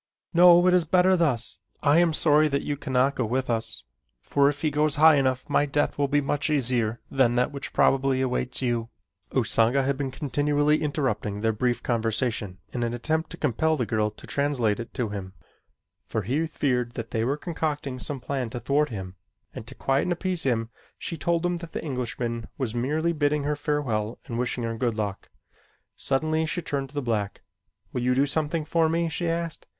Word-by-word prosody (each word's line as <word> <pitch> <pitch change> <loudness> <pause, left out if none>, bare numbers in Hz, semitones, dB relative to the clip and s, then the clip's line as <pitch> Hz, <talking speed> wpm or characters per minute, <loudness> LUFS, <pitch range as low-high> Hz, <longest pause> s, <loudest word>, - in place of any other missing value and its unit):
No, 175 0 +7
it 185 - +5
is 180 -1 +4
better 180 +3 +4
thus. 145 -10 +1 0.2
I 150 +3 +5
am 175 -1 +4
sorry 155 0 +4
that 140 -1 -1
you 145 - -2
cannot 135 0 +1
go 130 - -1
with 125 +3 -1
us, 110 - -3 0.4
for 140 0 +2
if 145 +1 -5
he 155 - +2
goes 150 0 +2
high 155 +2 +7
enough 130 -2 0
my 145 0 +2
death 145 0 0
will 140 - +2
be 145 +1 +2
much 145 +2 -1
easier 120 -5 +1
than 125 -3 +3
that 125 +4 +1
which 140 -1 -6
probably 135 -1 +3
awaits 130 0 -1
you." 120 -2 -1 0.4
Usanga 120 +4 +2
had 135 0 0
been 135 -1 -2
continually 145 +2 +1
interrupting 125 -9 -1
their 110 0 +1
brief 120 +2 -1
conversation 115 -4 -1 0.2
in 120 - -2
an 120 0 -1
attempt 160 +6 -1
to 175 - -8
compel 155 +3 +1
the 125 - 0
girl 110 -1 0
to 105 - -14
translate 130 -7 0
it 120 - -6
to 120 -4 -1
him, 95 -2 -6 0.7
for 110 - -2
he 145 - 0
feared 125 -6 -1
that 115 -1 -6
they 110 - 0
were 135 +5 0
concocting 150 -5 -3
some 140 +2 -3
plan 125 -1 -3
to 120 +1 -5
thwart 140 +5 +1
him, 95 -4 -7 0.4
and - - -8
to - - -7
quiet 135 0 +1
and 180 - 0
appease 180 0 -2
him, 115 -3 0 0.3
she 170 - -4
told 170 +2 0
him 175 0 0
that 170 -1 -10
the - - -4
Englishman 120 -4 -3
was 125 -5 -2
merely 150 +8 0
bidding 145 -1 +1
her 150 +1 0
farewell 125 -7 -1
and 115 0 -4
wishing 125 0 -1
her 115 0 -2
good 115 -1 -1
luck. 100 -2 -4 0.7
Suddenly 155 +4 0
she 175 +2 -3
turned 140 -3 -3
to 145 - -18
the 145 - -1
black. 105 -4 -2 0.5
"Will 125 - -1
you 125 +1 +2
do 135 +2 +3
something 155 +2 -1
for 160 +1 +2
me?" 170 +1 +1
she 165 +1 -2
asked. 165 -1 -3
135 Hz, 200 wpm, -26 LUFS, 120-150 Hz, 0.7 s, No